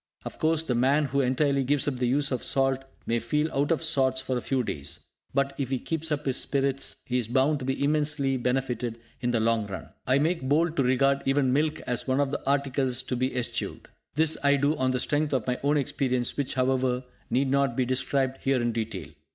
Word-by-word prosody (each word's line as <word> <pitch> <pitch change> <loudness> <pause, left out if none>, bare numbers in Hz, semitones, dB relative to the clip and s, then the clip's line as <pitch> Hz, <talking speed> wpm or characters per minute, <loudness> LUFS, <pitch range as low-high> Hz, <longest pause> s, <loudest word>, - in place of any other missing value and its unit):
Of - - -7
course, 160 0 +2
the 135 - -1
man 135 +5 +3
who 140 +1 0
entirely 135 +2 +1
gives 145 +2 +1
up 135 -3 -1
the 125 0 0
use 140 +3 +2
of 130 - -2
salt 135 0 +1 0.2
may 115 0 +1
feel 150 +7 -1
out 140 +3 +1
of 165 0 +1
sorts 135 -5 +2
for 130 0 -2
a 125 - -1
few 130 0 0
days; 70 -9 -5 0.3
but, 140 0 0
if 135 -3 -2
he 135 - 0
keeps 160 +4 -3
up 150 0 -1
his 135 -2 +1
spirits, 135 -1 +1
he 125 0 0
is 115 - -3
bound 135 +5 +2
to 130 - -6
be 135 +1 -1
immensely 145 -2 +2
benefitted 125 -2 -2 0.2
in 120 - -1
the 120 -2 +1
long 110 -1 +1
run. 95 -2 -7 0.2
I 130 +1 +4
make 165 +4 +1
bold 160 +3 +2
to 135 - +3
regard 135 +2 +2
even 135 -2 +2
milk 150 +2 0
as 125 +1 -3
one 130 +1 +1
of 140 -1 +1
the - - -3
articles 135 -2 +1
to 125 - -3
be 130 +1 -1
eschewed! 125 -2 -3 0.3
This 160 +1 +3
I 140 0 +5
do 145 +2 +1
on 130 -3 0
the 130 0 0
strength 145 +3 0
of 130 -5 0
my 125 0 -1
own 145 +2 +2
experience 130 -3 0
which, 140 -2 -2
however, 130 -1 +1 0.3
need 130 +1 +1
not 140 -3 +1
be 130 - +2
described 130 +1 0
here 135 -1 +1
in 120 0 0
detail. 115 -1 -4
135 Hz, 225 wpm, -27 LUFS, 125-145 Hz, 0.3 s, I